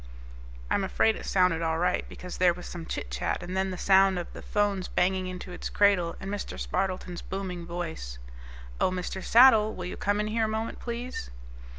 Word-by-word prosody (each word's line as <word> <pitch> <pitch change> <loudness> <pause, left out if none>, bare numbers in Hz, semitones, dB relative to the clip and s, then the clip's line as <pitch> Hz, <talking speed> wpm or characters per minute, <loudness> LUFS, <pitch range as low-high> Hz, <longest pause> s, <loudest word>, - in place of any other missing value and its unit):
I - - +4
am - - +2
afraid 220 +3 +2
it - - -8
sounded 180 -3 +3
all 160 -1 0
right, 180 +2 0
because 180 -1 -8
there 175 -1 +4
was 180 - -9
some 170 -2 -7
chitchat - - -3
and 185 - -5
then 190 0 +1
the 185 - -5
sound 190 0 +5
of 175 - -5
the - - -8
phone's 205 -3 0
banging 185 0 +1
into 185 0 -7
its 180 - -5
cradle, 195 -5 +3
and 195 - -5
Mr. 205 - -5
Spardleton's 180 - -2
booming 185 -3 -5
voice, 165 - -5 0.6
"Oh, - - +3
Mr. 185 +1 -4
Saddle. 225 -3 +6
Will 180 - -5
you 180 - -5
come 205 +1 0
in 210 - +1
here 220 +1 +1
a - - -1
moment, 220 +1 -3
please?" 235 - -5
185 Hz, 200 wpm, -28 LUFS, 175-205 Hz, 0.6 s, Saddle